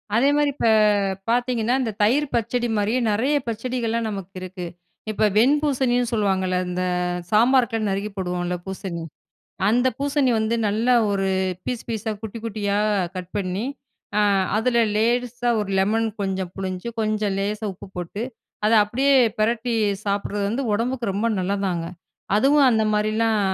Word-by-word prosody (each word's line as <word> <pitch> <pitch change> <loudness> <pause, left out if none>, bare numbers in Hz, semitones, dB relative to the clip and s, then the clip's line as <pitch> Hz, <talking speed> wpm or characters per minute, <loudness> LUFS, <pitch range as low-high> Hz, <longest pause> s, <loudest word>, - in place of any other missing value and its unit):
அதே 255 +5 +4
மாரி 295 -1 +3
இப்ப 235 - 0 0.6
பாத்தீங்கன்னா, 240 0 +1
இந்த 225 -3 -1
தயிர் 270 +8 +3
பச்சடி 240 +1 0
மாரியே 215 +5 +1
நெறைய 255 +8 +1
பச்சடிகள்லாம் 230 0 -2
நமக்கு 195 -2 -6
இருக்கு. 185 -1 -6 0.5
இப்ப 215 - -1
வெண் 255 +7 +5
பூசணின்னு 250 -4 +1
சொல்லுவாங்கல்ல 190 -3 +1
இந்த 180 +1 -2 0.5
சாம்பாருக்குலாம் 230 -1 +3
நறுக்கி 200 +2 -2
போடுவோம்ல 180 -1 -2
பூசணி, 190 -3 -5 0.7
அந்த 245 +3 +3
பூசணி 280 -1 +1
வந்து 220 +1 0
நல்லா 225 +5 +2 0.2
ஒரு 195 -1 0 0.4
பீஸ் 245 -2 -3
பீஸா, 220 -1 -2
குட்டி 220 +1 -6
குட்டியா, 205 -2 -1 0.4
கட் 180 -1 -6
பண்ணி, 195 +2 -2 0.5
அ - - +4 0.4
அதில 235 +2 +1 0.2
லேசா 245 +1 0
ஒரு 205 -2 -3
லெமன் 220 +4 +2
கொஞ்சம் 190 -2 -2
புளிஞ்சு, 185 +1 -4
கொஞ்சம் 215 -2 0
லேசா 210 +2 -2
உப்பு 185 - -12
போட்டு, 180 +5 -4 0.4
அதை 225 +1 +4
அப்படியே 270 +6 +2 0.3
பெரட்டி 230 +2 +1 0.3
சாப்பிடறது 200 0 -1
வந்து 255 +6 -1
உடம்புக்கு 235 0 -1
ரொம்ப 215 +4 0
நல்லதாங்க! 185 -2 -1 0.5
அதுவும் 275 +5 +5
அந்த 220 -1 +2
மாரிலாம் 215 +1 +1
220 Hz, 140 wpm, -23 LUFS, 200-240 Hz, 0.7 s, வெண்